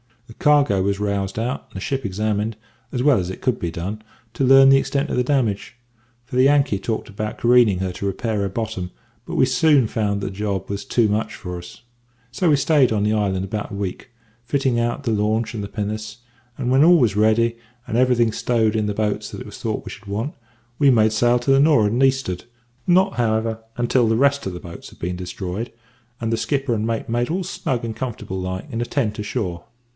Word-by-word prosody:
"The 115 Hz, -, -13 dB
cargo 145 Hz, -10 st, +4 dB
was 100 Hz, +1 st, 0 dB
roused 100 Hz, -1 st, -2 dB
out, 120 Hz, +4 st, -3 dB
and -, -, -25 dB
the -, -, -4 dB
ship 135 Hz, +5 st, -2 dB
examined, 105 Hz, +2 st, -1 dB, 0.4 s
as 125 Hz, -, -1 dB
well 145 Hz, -6 st, +5 dB
as 90 Hz, -1 st, -3 dB
it 95 Hz, -, -7 dB
could 125 Hz, -4 st, 0 dB
be 85 Hz, -, -2 dB
done, 95 Hz, +6 st, -5 dB, 0.3 s
to 125 Hz, -, -2 dB
learn 135 Hz, +1 st, +7 dB
the 135 Hz, -, +7 dB
extent 140 Hz, +2 st, -1 dB
of -, -, 0 dB
the 125 Hz, -, +3 dB
damage, 120 Hz, -6 st, -1 dB, 0.5 s
for 125 Hz, -, -5 dB
the 130 Hz, -, +5 dB
Yankee 140 Hz, -7 st, +3 dB
talked 110 Hz, +3 st, -3 dB
about 105 Hz, +1 st, -5 dB
careening 120 Hz, -5 st, +4 dB
her 95 Hz, -1 st, -2 dB
to 100 Hz, +2 st, -4 dB
repair 110 Hz, +2 st, -2 dB
her 100 Hz, -1 st, -1 dB
bottom; 105 Hz, -3 st, -4 dB, 0.4 s
but -, -, -5 dB
we -, -, +4 dB
soon 135 Hz, +1 st, +4 dB
found 105 Hz, -2 st, -1 dB
that -, -, -3 dB
the -, -, -4 dB
job 100 Hz, -1 st, -3 dB
was 100 Hz, +4 st, -4 dB
too 120 Hz, -4 st, +2 dB
much 105 Hz, +2 st, -1 dB
for 90 Hz, -1 st, -6 dB
us. 90 Hz, +5 st, -11 dB, 0.5 s
So 170 Hz, +7 st, +1 dB
we 150 Hz, -, +5 dB
stayed 140 Hz, -2 st, +3 dB
on 105 Hz, -2 st, +1 dB
the 105 Hz, +1 st, +2 dB
island 95 Hz, -3 st, 0 dB
about 105 Hz, +2 st, -4 dB
a -, -, -5 dB
week, 100 Hz, +4 st, -5 dB, 0.3 s
fitting 130 Hz, -1 st, 0 dB
out 120 Hz, +4 st, -1 dB
the 120 Hz, -, 0 dB
launch 110 Hz, +2 st, 0 dB
and 105 Hz, -3 st, -4 dB
the -, -, -4 dB
pinnace; 105 Hz, +1 st, -5 dB, 0.4 s
and 125 Hz, -2 st, -1 dB
when 135 Hz, +2 st, +5 dB
all 175 Hz, +2 st, +7 dB
was 115 Hz, -, +2 dB
ready, 115 Hz, +2 st, +3 dB, 0.3 s
and -, -, -4 dB
everything 120 Hz, -2 st, +3 dB
stowed 110 Hz, -1 st, +1 dB
in 110 Hz, -1 st, 0 dB
the 105 Hz, -, -2 dB
boats 105 Hz, -1 st, -1 dB
that -, -, -8 dB
it -, -, -8 dB
was -, -, -10 dB
thought -, -, -3 dB
we -, -, -7 dB
should 105 Hz, 0 st, -12 dB
want, 110 Hz, +9 st, -3 dB, 0.5 s
we 140 Hz, -2 st, +5 dB
made 110 Hz, -4 st, +4 dB
sail 120 Hz, +2 st, +3 dB
to 120 Hz, +3 st, 0 dB
the 135 Hz, -, +5 dB
nor'ard 140 Hz, -9 st, +4 dB
and 120 Hz, +4 st, 0 dB
east'ard; 135 Hz, -10 st, +1 dB, 0.4 s
not, 185 Hz, +2 st, +4 dB
however, 110 Hz, -1 st, 0 dB, 0.2 s
until 120 Hz, 0 st, +2 dB
the 110 Hz, -, +2 dB
rest 140 Hz, 0 st, +2 dB
of 95 Hz, -, -4 dB
the 90 Hz, -, -6 dB
boats 85 Hz, -1 st, -10 dB
had -, -, -18 dB
been 90 Hz, +1 st, -4 dB
destroyed, 90 Hz, +4 st, -5 dB, 0.5 s
and 115 Hz, 0 st, -1 dB
the -, -, +1 dB
skipper 135 Hz, +3 st, -1 dB
and 110 Hz, 0 st, -1 dB
mate 115 Hz, -1 st, -2 dB
made 120 Hz, +1 st, 0 dB
all 185 Hz, +3 st, -1 dB
snug 125 Hz, -7 st, -3 dB
and 110 Hz, -1 st, -4 dB
comfortable 115 Hz, -6 st, -5 dB
like 95 Hz, 0 st, -4 dB
in 115 Hz, -1 st, -2 dB
a -, -, 0 dB
tent 110 Hz, -6 st, -1 dB
ashore." 105 Hz, -5 st, -3 dB
110 Hz, 230 wpm, -21 LUFS, 100-125 Hz, 0.5 s, learn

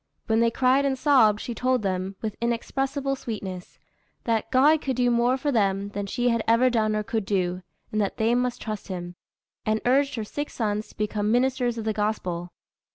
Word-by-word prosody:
When 220 Hz, -1 st, +2 dB
they 230 Hz, 0 st, +4 dB
cried 255 Hz, +3 st, +3 dB
and 270 Hz, -1 st, 0 dB
sobbed, 255 Hz, -7 st, +4 dB
she 240 Hz, -, -4 dB
told 255 Hz, 0 st, 0 dB
them, 190 Hz, 0 st, -2 dB
with 215 Hz, -2 st, -3 dB
inexpressible 270 Hz, +4 st, -1 dB
sweetness, 195 Hz, -8 st, -6 dB, 0.5 s
that 225 Hz, -2 st, 0 dB
"God 290 Hz, +4 st, +4 dB
could 265 Hz, -2 st, -2 dB
do 245 Hz, 0 st, +2 dB
more 240 Hz, +2 st, +2 dB
for 290 Hz, +2 st, -1 dB
them 200 Hz, -4 st, +1 dB
than 205 Hz, 0 st, -4 dB
she 245 Hz, +4 st, 0 dB
had 230 Hz, -1 st, +1 dB
ever 235 Hz, +3 st, +4 dB
done 215 Hz, -2 st, +1 dB
or 215 Hz, -, -1 dB
could 220 Hz, 0 st, -2 dB
do, 185 Hz, -2 st, -1 dB, 0.3 s
and 215 Hz, -, 0 dB
that 200 Hz, -, -2 dB
they 225 Hz, +2 st, +2 dB
must 250 Hz, 0 st, 0 dB
trust 215 Hz, -2 st, -5 dB
Him," 175 Hz, -2 st, -5 dB, 0.5 s
and 220 Hz, 0 st, +1 dB
urged 275 Hz, +3 st, +3 dB
her 225 Hz, -, -3 dB
six 290 Hz, +7 st, -5 dB
sons 210 Hz, -2 st, -1 dB
to -, -, -19 dB
become 210 Hz, 0 st, -1 dB
ministers 245 Hz, -1 st, +1 dB
of 225 Hz, -, -4 dB
the 220 Hz, -, 0 dB
Gospel. 185 Hz, -5 st, -2 dB
225 Hz, 200 wpm, -25 LUFS, 210-255 Hz, 0.5 s, they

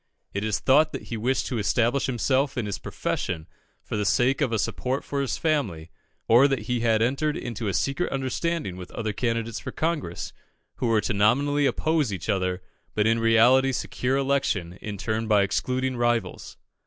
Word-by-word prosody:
It 100 Hz, -, -2 dB
is 110 Hz, -2 st, 0 dB
thought 150 Hz, +4 st, +4 dB
that -, -, -7 dB
he -, -, -1 dB
wished 125 Hz, +5 st, 0 dB
to 125 Hz, -, -2 dB
establish 120 Hz, +5 st, +1 dB
himself 130 Hz, +2 st, 0 dB
in 120 Hz, -, -1 dB
his 100 Hz, -, -4 dB
profession 80 Hz, -1 st, -3 dB, 0.4 s
for -, -, -4 dB
the 105 Hz, -, 0 dB
sake 125 Hz, +8 st, +2 dB
of 135 Hz, -5 st, +1 dB
a 115 Hz, -, +1 dB
support 130 Hz, +5 st, -2 dB
for 140 Hz, -1 st, -2 dB
his 135 Hz, -, -2 dB
family, 105 Hz, -, -1 dB, 0.4 s
or 120 Hz, +5 st, +6 dB
that 135 Hz, -6 st, -1 dB
he 125 Hz, +2 st, -1 dB
had 115 Hz, -1 st, +2 dB
entered 140 Hz, +5 st, 0 dB
into 115 Hz, -2 st, -4 dB
a 100 Hz, -, -1 dB
secret 135 Hz, -, 0 dB
understanding 135 Hz, -, -2 dB
with 90 Hz, -1 st, -8 dB
other 110 Hz, -2 st, -3 dB
candidates 115 Hz, 0 st, -2 dB
for -, -, -6 dB
Congress, 155 Hz, -, -3 dB, 0.4 s
who 125 Hz, -, -1 dB
were 110 Hz, -2 st, +3 dB
to 110 Hz, -, -1 dB
nominally 140 Hz, +8 st, +3 dB
oppose 155 Hz, -6 st, +1 dB
each 95 Hz, 0 st, -5 dB
other, 90 Hz, -2 st, 0 dB, 0.3 s
but 105 Hz, -, +2 dB
in 115 Hz, +1 st, +3 dB
reality 120 Hz, +4 st, +5 dB
secure 130 Hz, +1 st, -1 dB
election 135 Hz, -11 st, 0 dB
in 105 Hz, -1 st, -5 dB
turn 110 Hz, +3 st, -2 dB
by 105 Hz, -2 st, +4 dB
excluding 130 Hz, +6 st, -1 dB
rivals. 120 Hz, -5 st, -1 dB
120 Hz, 185 wpm, -25 LUFS, 105-135 Hz, 0.4 s, or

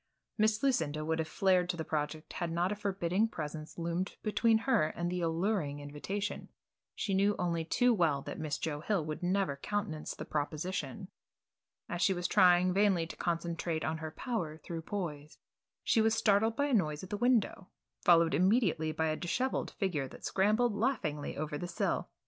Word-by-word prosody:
Miss 215 Hz, +1 st, +2 dB
Lucinda 155 Hz, -, +1 dB
would 160 Hz, +1 st, 0 dB
have 160 Hz, -, -1 dB
flared 185 Hz, -1 st, +2 dB
to 175 Hz, -, -1 dB
the 160 Hz, -, -2 dB
project 155 Hz, +1 st, -3 dB
had 170 Hz, -1 st, -3 dB
not 175 Hz, +3 st, +1 dB
a -, -, -1 dB
forbidding 200 Hz, 0 st, 0 dB
presence 155 Hz, -5 st, -6 dB
loomed 170 Hz, +2 st, -2 dB
between 220 Hz, +1 st, +3 dB
her 210 Hz, -13 st, +3 dB
and 175 Hz, +2 st, -3 dB
the 180 Hz, 0 st, -2 dB
alluring 165 Hz, -3 st, 0 dB
invitation. 150 Hz, +8 st, -4 dB, 0.5 s
She 200 Hz, -, -2 dB
knew 200 Hz, +2 st, +3 dB
only 170 Hz, -2 st, 0 dB
too 245 Hz, +9 st, +3 dB
well 160 Hz, -9 st, +2 dB
that -, -, -6 dB
Miss 155 Hz, -2 st, -2 dB
Joe 150 Hz, -2 st, -3 dB
Hill 175 Hz, 0 st, 0 dB
would 155 Hz, -1 st, -5 dB
never 180 Hz, -5 st, 0 dB
countenance 165 Hz, -2 st, -3 dB
the -, -, -7 dB
proposition. 180 Hz, +6 st, -3 dB, 0.8 s
As 175 Hz, -, -4 dB
she 190 Hz, 0 st, +3 dB
sat 175 Hz, 0 st, -4 dB
trying 180 Hz, -2 st, +5 dB
vainly 195 Hz, -4 st, +3 dB
to 165 Hz, -, -8 dB
concentrate 170 Hz, -1 st, -2 dB
on 155 Hz, 0 st, -2 dB
her 160 Hz, 0 st, -4 dB
"Power 165 Hz, -5 st, -3 dB
Through 165 Hz, +1 st, -6 dB
Poise," 160 Hz, -5 st, -5 dB, 0.5 s
she 225 Hz, -, +3 dB
was 225 Hz, 0 st, +3 dB
startled 220 Hz, 0 st, +3 dB
by 285 Hz, -, +1 dB
a 285 Hz, -, -1 dB
noise 155 Hz, -8 st, +1 dB
at 185 Hz, -, -9 dB
the -, -, 0 dB
window, 235 Hz, -5 st, +1 dB, 0.3 s
followed 165 Hz, -2 st, +5 dB
immediately 185 Hz, -5 st, +2 dB
by 160 Hz, 0 st, 0 dB
a 155 Hz, -, 0 dB
dishevelled 250 Hz, +11 st, -1 dB
figure 165 Hz, -9 st, -2 dB
that -, -, -11 dB
scrambled 215 Hz, +4 st, +2 dB
laughingly 200 Hz, -, -1 dB
over 150 Hz, 0 st, -3 dB
the 175 Hz, -, -4 dB
sill. -, -, -1 dB
175 Hz, 180 wpm, -32 LUFS, 155-205 Hz, 0.8 s, trying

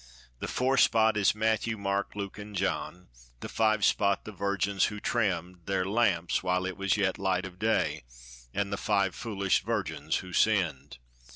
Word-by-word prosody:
The -, -, -4 dB
'four 130 Hz, +2 st, +1 dB
spot' 110 Hz, -1 st, +4 dB
is 100 Hz, -1 st, +3 dB
Matthew, 110 Hz, +1 st, 0 dB
Mark, 100 Hz, 0 st, -2 dB
Luke, 100 Hz, 0 st, -5 dB
an' 105 Hz, 0 st, -9 dB
John; 90 Hz, -2 st, -2 dB, 0.3 s
The -, -, -5 dB
'five 110 Hz, -2 st, +2 dB
spot' 100 Hz, -2 st, +2 dB
the 110 Hz, -, -6 dB
virgins 100 Hz, -1 st, 0 dB
who 105 Hz, -, -4 dB
trimmed 90 Hz, -6 st, -2 dB
Their 95 Hz, -1 st, 0 dB
lamps 100 Hz, -5 st, +1 dB
while 90 Hz, 0 st, 0 dB
yet -, -, -1 dB
it 95 Hz, -, -8 dB
was 100 Hz, +1 st, +1 dB, 0.2 s
light 95 Hz, -1 st, 0 dB
of 90 Hz, -1 st, -10 dB
the 110 Hz, -, 0 dB
day; 110 Hz, -, +1 dB, 0.5 s
And 100 Hz, +4 st, -2 dB
the -, -, -1 dB
five 100 Hz, -3 st, +1 dB
foolish 100 Hz, -5 st, 0 dB
virgins 80 Hz, -9 st, -2 dB
who 90 Hz, -, -10 dB
sinned. 80 Hz, -, +1 dB
100 Hz, 175 wpm, -29 LUFS, 90-110 Hz, 0.5 s, spot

